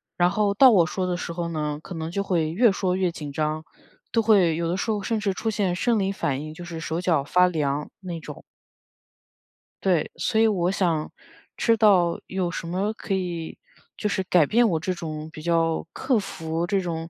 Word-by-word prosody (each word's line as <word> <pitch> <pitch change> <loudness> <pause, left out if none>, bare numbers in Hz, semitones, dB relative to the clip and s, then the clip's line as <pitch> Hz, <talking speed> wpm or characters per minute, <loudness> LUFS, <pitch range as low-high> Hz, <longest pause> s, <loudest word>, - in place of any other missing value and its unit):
然 175 0 +3
后 200 +1 +1
到 255 +5 +7
我 180 -6 +5
说 185 +3 -2
的 180 -1 -1
时 175 -1 -5
候 170 0 -3
呢， 150 -2 -2
可 - - -8
能 160 0 -4
就 200 +4 -2
会 170 -5 0
越 220 +6 +4
说 185 -2 0
越 185 -2 +1
紧 150 -3 -7
张， 155 +1 -1 0.5
都 230 - +3
会 200 -7 +4
有 170 +1 -1
的 175 - -1
时 210 - -2
候 210 -1 -1
甚 225 +2 -1
至 200 -2 0
出 225 - -2
现 205 -5 0
生 230 +4 +1
理 195 -1 0
反 145 -8 -2
应， 155 0 -7
就 175 +2 -9
是 170 -2 -6
手 165 +1 -3
脚 165 -6 +2
发 180 +5 +4
凉 150 -4 -1
那 180 -3 -5
种。 - - -9 1.4
对， 180 -5 +1
所 220 -2 +1
以 225 - +6
我 185 -5 +1
想 170 -5 0 0.5
知 230 -1 +3
道 190 -6 +4
有 185 -2 -2
什 170 - -5
么 190 +5 -1
可 215 - -6
以 175 -3 -4 0.4
就 210 - -1
是 190 - -1
改 175 -4 +4
变 235 +9 +4
我 165 -5 0
这 185 +3 -1
种 155 -2 -6
比 155 - -10
较 165 -1 +1
克 260 -3 +1
服 165 -4 -3
这 195 +2 +1
种 165 -2 -4
175 Hz, 230 characters per minute, -24 LUFS, 165-200 Hz, 1.4 s, 到